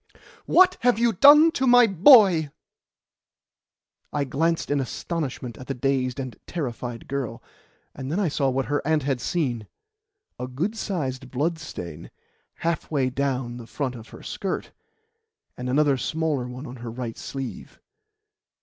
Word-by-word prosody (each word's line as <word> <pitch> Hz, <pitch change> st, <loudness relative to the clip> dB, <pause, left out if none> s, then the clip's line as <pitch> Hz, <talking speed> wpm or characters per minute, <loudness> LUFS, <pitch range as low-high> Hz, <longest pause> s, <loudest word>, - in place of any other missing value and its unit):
"What 370 Hz, +1 st, +5 dB
have 245 Hz, -1 st, +3 dB
you 235 Hz, 0 st, +2 dB
done 295 Hz, -, +8 dB
to 265 Hz, -4 st, 0 dB
my 245 Hz, 0 st, +7 dB
boy?" 195 Hz, -, +6 dB, 1.6 s
I 145 Hz, -, 0 dB
glanced 160 Hz, +4 st, -1 dB
in 145 Hz, -, +2 dB
astonishment 135 Hz, -3 st, -4 dB
at 130 Hz, -, -10 dB
the 135 Hz, -, -3 dB
dazed 130 Hz, 0 st, -1 dB
and 130 Hz, -4 st, -5 dB
terrified 120 Hz, -7 st, -5 dB
girl, 130 Hz, -4 st, -4 dB, 0.5 s
and 130 Hz, +1 st, -6 dB
then 175 Hz, -, 0 dB
I 200 Hz, -, +1 dB
saw 140 Hz, -2 st, 0 dB
what 130 Hz, 0 st, -1 dB
her 145 Hz, +4 st, -1 dB
aunt 155 Hz, 0 st, +1 dB
had 135 Hz, -3 st, -1 dB
seen 125 Hz, -, -2 dB, 0.7 s
a 125 Hz, -, -4 dB
good 165 Hz, -, -3 dB
sized 135 Hz, -, -3 dB
blood 160 Hz, +6 st, -1 dB
stain 85 Hz, -, -8 dB, 0.6 s
halfway 150 Hz, -5 st, 0 dB
down 130 Hz, -3 st, -2 dB
the 120 Hz, -2 st, -10 dB
front 135 Hz, -1 st, -3 dB
of 115 Hz, -2 st, -10 dB
her -, -, -12 dB
skirt, 195 Hz, -, -4 dB, 0.8 s
and 125 Hz, 0 st, -5 dB
another 140 Hz, +1 st, +3 dB
smaller 155 Hz, -3 st, -1 dB
one 125 Hz, +3 st, -8 dB
on 130 Hz, -2 st, -9 dB
her 120 Hz, 0 st, -7 dB
right 115 Hz, 0 st, -5 dB
sleeve. 135 Hz, -2 st, -7 dB
140 Hz, 150 wpm, -24 LUFS, 125-170 Hz, 1.6 s, done